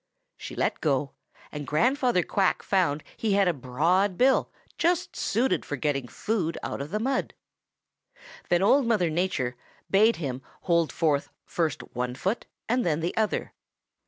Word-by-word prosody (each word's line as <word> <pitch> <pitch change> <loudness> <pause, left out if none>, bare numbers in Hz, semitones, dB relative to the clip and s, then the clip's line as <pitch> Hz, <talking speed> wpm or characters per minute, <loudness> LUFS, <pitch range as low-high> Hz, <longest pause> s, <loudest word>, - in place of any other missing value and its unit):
She - - -8
let - - -1
go, 140 -2 +1 0.4
and 150 -1 -6
Grandfather 245 - +2
Quack 195 +3 +1
found 170 -7 +1
he 215 -3 0
had 200 -1 +4
a 175 - +3
broad 165 +9 +1
bill 265 +1 +3 0.3
just 345 0 +1
suited 240 +6 +1
for 145 - -4
getting 135 -2 -1
food 170 - -2
out - - -4
of 140 - -5
the 210 +5 -1
mud. 260 +4 -1 1.1
Then 175 +1 +3
Old 265 +5 +4
Mother 195 -8 +2
Nature 155 -8 -1 0.4
bade 215 +4 +5
him 135 -5 -4 0.2
hold 170 -3 +2
forth 150 -4 +1 0.2
first 160 -5 -1
one 125 0 -2
foot 195 - -2 0.2
and 245 +2 +1
then 160 -2 0
the 170 - -2
other. 220 -1 -1
175 Hz, 155 wpm, -27 LUFS, 145-215 Hz, 1.1 s, bade